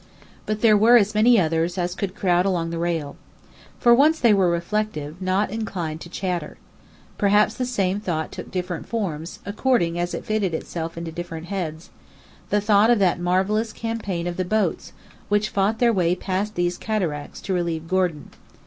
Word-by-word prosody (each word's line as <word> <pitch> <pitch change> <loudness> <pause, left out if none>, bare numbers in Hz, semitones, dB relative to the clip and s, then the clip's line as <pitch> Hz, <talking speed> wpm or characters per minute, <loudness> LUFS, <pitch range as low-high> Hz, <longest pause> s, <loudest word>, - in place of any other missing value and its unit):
But 215 0 -2
there 220 -2 +6
were 225 +4 +7
as 210 -1 +2
many 225 +2 +5
others 165 +1 0
as 175 0 -1
could 190 0 -4
crowd 180 -3 +2
along 175 -4 -1
the 165 - -3
rail. 165 -4 -2 0.6
For 240 - +6
once 300 +6 +4
they 235 -3 +5
were 190 -3 +3
reflective, 170 -2 -2
not 190 +3 0
inclined 175 -8 -4
to 170 - -9
chatter. 180 -1 -3 0.6
Perhaps 210 +1 +4
the 250 0 -3
same 200 -5 0
thought 165 -6 -3
took - - -8
different 180 -2 -4
forms, 175 -8 -3
according 200 -5 +1
as 175 0 -2
it - - -6
fitted 205 -6 0
itself 165 0 -5
into 165 -1 -5
different 165 0 -7
heads; 165 -4 -4 0.6
the 205 - +2
thought 205 +1 +4
of 240 - +5
that 185 -4 +2
marvellous 190 +5 +1
campaign 215 -7 -4
of 175 0 -3
the 185 - 0
boats 215 +4 -1 0.4
which 205 +1 +2
fought 200 +3 +1
their 235 -1 +3
way 180 -3 +2
past 195 +3 -3
these 175 0 -1
cataracts 175 -10 -3
to 190 - -3
relieve 170 -2 -2
Gordon. 180 -5 -1
185 Hz, 175 wpm, -23 LUFS, 170-215 Hz, 0.6 s, were